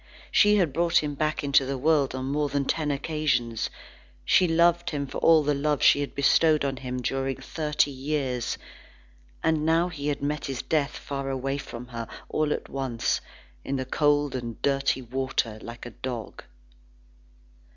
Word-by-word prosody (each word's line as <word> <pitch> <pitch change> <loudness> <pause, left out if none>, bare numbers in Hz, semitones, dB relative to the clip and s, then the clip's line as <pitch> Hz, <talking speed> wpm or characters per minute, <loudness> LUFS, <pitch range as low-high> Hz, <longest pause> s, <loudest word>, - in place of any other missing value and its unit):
She 210 0 +5
had 175 -9 +2
brought 170 +1 +3
him 145 -1 -2
back 155 +2 -1
into 140 -1 +4
the 135 +1 -3
world 145 -1 +2
on 130 0 -3
more 145 +2 0
than 140 0 0
ten 155 +1 0
occasions; 140 -6 -1 0.6
she 180 - +5
loved 170 +1 +3
him 145 -2 -2
for 135 - -5
all 160 -2 +5
the 145 0 +1
love 145 +1 0
she - - +6
had 145 - -4
bestowed 150 +2 +4
on 135 -1 -2
him 125 -1 -5
during 135 +2 -1
thirty 150 -2 0
years. 135 -3 -2 0.9
And 160 -1 +2
now 165 +2 +3
he 145 -4 -5
had 145 -1 -2
met 150 0 -2
his 135 -2 -4
death 150 -3 0
far 140 -1 -4
away 135 +1 -2
from 125 -3 -8
her, 115 -2 -5 0.2
all 155 -1 0
at - - -2
once, 130 -4 -1 0.4
in 140 - -2
the 130 -1 -2
cold 145 +1 +2
and 120 -3 -5
dirty 135 -2 +1
water, 125 -3 -2
like 115 +1 -9
a 120 - -7
dog. 120 -3 -6
140 Hz, 170 wpm, -26 LUFS, 130-150 Hz, 0.9 s, she